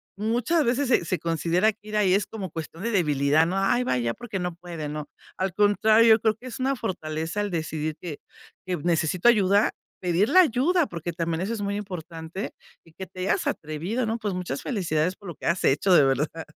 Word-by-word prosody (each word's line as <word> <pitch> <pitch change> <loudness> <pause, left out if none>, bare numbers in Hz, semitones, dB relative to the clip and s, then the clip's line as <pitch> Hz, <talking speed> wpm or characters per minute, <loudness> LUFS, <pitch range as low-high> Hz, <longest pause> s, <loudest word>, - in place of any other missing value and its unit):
muchas 235 - +1
veces 255 +2 +1
se 255 - +5
se 170 - -8
se 180 -3 -1
considera 170 +5 +1
que 215 0 -21
ir 215 0 -2
ahí, 190 -3 +3
es 200 0 +1
como 195 -6 -6
cuestión 165 +2 -7
de 235 - -1
debilidad, 150 -4 +3
¿no?, 190 +2 -1
"Ay 240 +6 +2
va - - 0
ahí, 120 -2 0
porque 225 -5 -5
no 180 -1 -3
puede", 170 -3 -7
¿no?, 150 0 -6 0.3
al 190 -1 -1
contrario, 220 +2 +5
creo 220 -1 +2
que 245 - -16
es 255 - -7
una 270 +1 +1
fortaleza 165 -4 -3
el 205 - -2
decidir 155 -2 -3
que 160 -5 -7 0.5
que 180 -1 -1
necesito 170 +4 +1
ayuda, 205 -3 +4 0.3
pedir 180 +3 +1
la 370 - +7
ayuda, 320 +4 +2
porque 170 -3 -5
también 165 -1 -2
eso 200 +5 -2
es 220 - -4
muy 200 0 -2
importante, 175 -2 -6 0.3
y 165 - -19
que 190 +1 -8
te 185 - -9
hayas 190 - 0
atrevido, 170 +11 -2
¿no?, 225 +1 -2
pues, 205 -4 -2
muchas 175 -7 -4
felicidades 180 - -1
por 200 - -13
lo 170 - -7
que - - -11
has 170 +1 0
hecho 165 +7 +3
de 145 - +7
verdad. 150 +4 0
185 Hz, 215 wpm, -25 LUFS, 160-220 Hz, 0.5 s, la